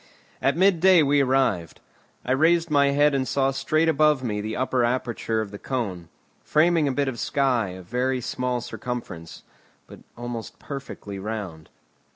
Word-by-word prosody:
At 140 +4 +1
mid 190 -1 +4
day 185 -2 +6
we 145 0 +3
arrived. 130 - 0 0.5
I 125 - -2
raised 165 +4 +3
my 140 -1 +4
head 145 +1 +3
and 130 -1 0
saw 135 +3 +1
straight 155 +4 0
above 150 -3 +3
me 105 -4 -2
the 110 +1 -4
upper 130 -1 +1
aperture 120 -2 -1
of 105 -2 -6
the 100 - -9
cone, 100 -10 -4 0.3
framing 160 0 +2
a - - +1
bit 140 +1 0
of 125 -3 -4
sky 130 -6 +1
of 95 - -12
very 125 +5 -1
small 125 0 -2
circumference, 100 -13 -7 0.4
but - - -13 0.2
almost 120 -2 -6
perfectly 135 -8 -8
round. 95 -6 -6
130 Hz, 165 wpm, -24 LUFS, 110-145 Hz, 0.5 s, day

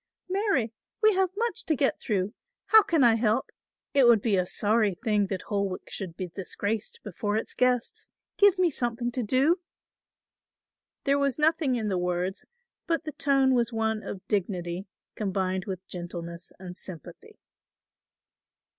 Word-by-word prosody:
"Marry, 370 - +1 0.3
we 435 0 +6
have 380 -1 +2
much 470 +1 -1
to 315 - +1
get 275 0 +1
through. 200 -2 -1 0.4
How 440 0 +9
can 340 -9 +2
I 235 -2 +7
help? 225 +2 +1 0.4
It 275 -4 +6
would 235 -2 +7
be 210 -1 +1
a 180 -1 +1
sorry 210 -1 +2
thing 210 -1 +1
that 190 -1 -4
Holwick 200 -3 -3
should 185 -5 -5
be 185 - -3
disgraced 205 +4 -4
before 205 +1 -2
its 220 - -3
guests. 250 -1 0 0.3
Give 405 -2 +5
me 360 -2 +3
something 240 -2 -2
to 250 - -2
do." 265 - +2 1.4
There 280 0 +2
was 280 -3 +1
nothing 305 -3 +2
in 220 -3 -1
the 185 -2 0
words, 180 +1 -2 0.4
but 330 -1 0
the 305 - -5
tone 275 -2 +3
was 240 -1 +2
one 220 -1 0
of 190 -3 -8
dignity 185 -2 -2 0.3
combined 190 -2 -1
with 190 -2 -5
gentleness 175 -1 -7
and 180 -1 -9
sympathy. 175 -5 -10
220 Hz, 155 wpm, -27 LUFS, 190-270 Hz, 1.4 s, How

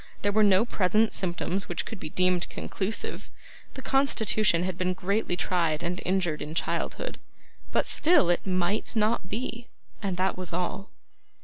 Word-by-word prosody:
There 205 - +2
were 215 +2 +3
no 200 +1 +5
present 215 0 +1
symptoms 185 +1 -1
which 175 - -2
could 225 - -7
be - - -6
deemed 180 +1 +1
conclusive. 200 +3 -3 0.5
The 265 - -8
constitution 215 -9 +3
had 185 -1 -2
been 185 0 -1
greatly 195 0 -1
tried 170 -5 0
and 175 +1 -2
injured 180 -5 0
in 150 +2 -6
childhood, - - -2 0.5
but - - +1
still 330 - +4
it 175 - 0
MIGHT 185 +3 -1
not 220 +1 +1
be 235 0 -4 0.3
and 195 -4 -2
that 190 +1 +1
was 180 -2 -5
all. 180 +3 -3
190 Hz, 155 wpm, -27 LUFS, 180-215 Hz, 0.5 s, no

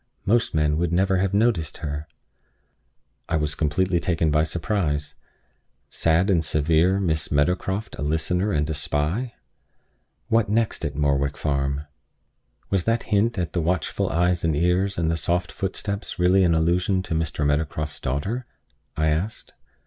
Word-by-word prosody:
Most 115 -3 +2
men 75 -1 +2
would 85 0 0
never 95 +2 +2
have 95 0 +1
noticed 100 -7 +1
her." 75 +1 -4 1.2
I - - +1
was 75 -1 0
completely 90 +4 +1
taken 85 -3 0
by 75 +1 +3
surprise. 80 -4 -1 0.8
Sad 85 +3 +2
and 85 -3 +2
severe 80 +5 +2
Miss 80 -5 -1
Meadowcroft 90 +7 0
a - - -3
listener 90 +6 0
and 75 -3 0
a 80 - -2
spy! 80 - -1 0.9
What 115 -2 +2
next 110 -5 0
at 70 -2 -3
Morwick 70 -1 +1
Farm? 70 0 -1 0.9
"Was 95 -3 +1
that 115 +1 +1
hint 110 +3 +2
at 90 -2 -2
the 85 - 0
watchful 85 -1 -1
eyes 90 +2 +1
and 80 -2 +1
ears, 90 +5 +1
and 80 -1 +1
the 80 - 0
soft 90 +1 -1
footsteps, 100 +2 -4
really 90 +2 +4
an 85 -2 +3
allusion 90 +4 +1
to 90 - -4
Mr. 80 -2 -1
Meadowcroft's 75 +1 -1
daughter?" 100 - -3 0.5
I 80 0 +2
asked. 85 +8 -3
85 Hz, 150 wpm, -24 LUFS, 75-95 Hz, 1.2 s, really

